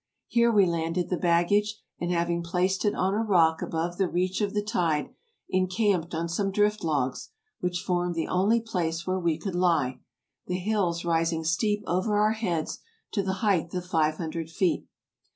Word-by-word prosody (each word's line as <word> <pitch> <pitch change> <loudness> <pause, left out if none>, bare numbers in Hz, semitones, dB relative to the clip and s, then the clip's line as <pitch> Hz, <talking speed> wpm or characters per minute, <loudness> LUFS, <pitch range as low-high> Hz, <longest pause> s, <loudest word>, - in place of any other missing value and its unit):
Here 235 0 +3
we 205 -3 +5
landed 170 +1 -1
the - - +3
baggage, 205 +5 +2 0.2
and 175 - -2
having 170 0 0
placed 180 +4 0
it 205 - +2
on 190 +1 +1
a 215 - +1
rock 170 -7 +3
above 170 +2 -3
the 190 - +3
reach 185 +3 0
of 205 -1 -1
the 205 - +1
tide, 170 -9 0 0.4
encamped 185 -2 +1
on 165 +1 -1
some 195 +4 -1
drift 210 +1 +1
logs, 140 -5 -1 0.3
which 180 -1 -2
formed 175 -1 0
the 165 - -1
only 205 +6 +2
place 170 -7 -2
where 185 0 0
we 170 -3 +1
could 190 +3 -4
lie, 165 -8 +1 0.5
the 180 - -1
hills 180 -3 0
rising 165 -1 +1
steep 205 +6 0
over 185 +5 0
our 210 +1 +4
heads 180 -8 -2 0.3
to 205 - 0
the 190 -1 -1
height 175 -5 +2
of 180 0 -3
five 155 -4 +1
hundred 165 -1 -4
feet. 175 +2 0
180 Hz, 180 wpm, -27 LUFS, 165-200 Hz, 0.5 s, we